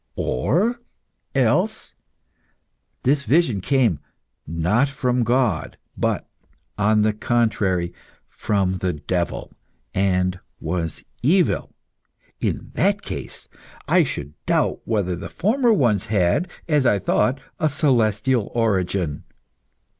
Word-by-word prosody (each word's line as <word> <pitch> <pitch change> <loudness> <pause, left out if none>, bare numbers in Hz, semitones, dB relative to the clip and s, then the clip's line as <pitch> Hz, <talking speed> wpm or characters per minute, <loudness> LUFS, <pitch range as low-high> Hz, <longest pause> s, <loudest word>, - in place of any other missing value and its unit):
Or 190 - 0 0.6
else - - +1 1.1
this 140 +2 +2
vision 130 - +2
came, 115 - +2 0.5
not 90 - +2
from 125 -3 0
God, 120 -7 0 0.2
but, - - -1 0.5
on 105 +1 +3
the 110 0 +2
contrary, 105 -6 0 0.3
from 95 -3 -1
the 90 0 0
devil, 85 +3 -3 0.4
and 90 -1 +1 0.2
was 80 0 -3 0.2
evil. 170 +8 +2 0.6
In - - -2
that - - +1
case - - -7 0.4
I - - +5
should 70 +1 -3
doubt - - +1
whether 100 -5 0
the 90 - -7
former 235 +5 +2
ones 120 - +2
had, 105 - +1 0.2
as 150 -4 +3
I 105 - +4
thought, 105 +6 +1 0.2
a 155 -2 +2
celestial 125 -5 +1
origin. 95 -8 0
105 Hz, 105 wpm, -22 LUFS, 90-135 Hz, 1.1 s, I